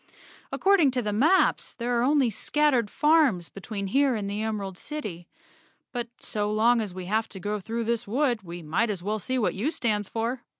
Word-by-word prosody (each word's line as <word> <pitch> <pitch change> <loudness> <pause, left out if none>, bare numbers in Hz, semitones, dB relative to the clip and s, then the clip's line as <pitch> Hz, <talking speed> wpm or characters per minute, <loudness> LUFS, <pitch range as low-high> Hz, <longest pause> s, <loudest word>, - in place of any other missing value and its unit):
According 385 -7 +4
to 250 - +1
the 210 -1 -1
maps 315 - +3
there 240 0 -1
are - - +2
only 270 -2 +3
scattered 260 0 +1
farms 295 - +3
between 200 0 -6
here 270 +5 +2
and 205 -2 -3
the 205 +1 -3
Emerald 205 -4 -3
City. 200 - -7 0.6
But 240 -2 -3
so 210 -1 -2
long 230 +2 +3
as 210 -3 -4
we 185 0 -7
have 220 +4 0
to 190 - -9
go 210 +3 -2
through 230 +4 -3
this 235 0 -1
wood, 245 0 +1
we 175 -2 -8
might 175 +9 0
as 190 -4 -3
well 215 +2 -1
see 255 +6 -2
what 225 - +1
U 220 +10 -1
stands 210 - -1
for." 235 +3 -2
225 Hz, 200 wpm, -26 LUFS, 200-255 Hz, 0.6 s, According